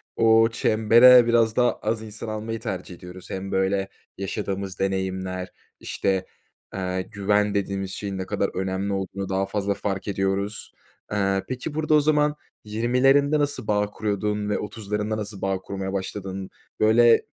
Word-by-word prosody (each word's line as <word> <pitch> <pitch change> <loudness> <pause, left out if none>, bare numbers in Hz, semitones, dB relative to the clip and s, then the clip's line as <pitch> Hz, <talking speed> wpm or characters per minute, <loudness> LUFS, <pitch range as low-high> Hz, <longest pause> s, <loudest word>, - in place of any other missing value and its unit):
o 115 0 +5
çembere 115 +3 +6
biraz 115 -2 +3
daha 125 -1 +2
az 110 +1 -1
insan 110 +1 -8
almayı 110 +1 -4
tercih 90 -1 -5
ediyoruz. 90 0 -11
Hem, 95 0 -5
böyle, 95 +1 +1 0.3
yaşadığımız 100 -1 -4
deneyimler, 95 -1 -2 0.3
işte, 95 -1 -1 0.5
eee, 95 -1 -2
güven 105 +1 0
dediğimiz 100 -1 -2
şeyin 100 -1 -4
ne 95 - -3
kadar 100 0 -1
önemli 95 +1 -2
olduğunu 95 0 -4
daha 95 0 0
fazla 100 0 -1
fark 100 0 -4
ediyoruz. 100 +1 -2 0.4
Eee, 100 -2 +1
peki, 130 +4 -4
burada 155 0 0
o 150 - +7
zaman 150 0 +2 0.3
20'lerinde 130 +7 +3
nasıl 145 -7 -2
bağ 105 -1 +2
kuruyordun 105 0 -2
ve 105 - 0
30'larında 105 0 -3
nasıl 105 -2 -6
bağ 95 -1 0
kurmaya 95 0 -5
başladın? 95 0 -4 0.3
Böyle, 115 +2 +5
100 Hz, 145 wpm, -24 LUFS, 95-110 Hz, 0.5 s, o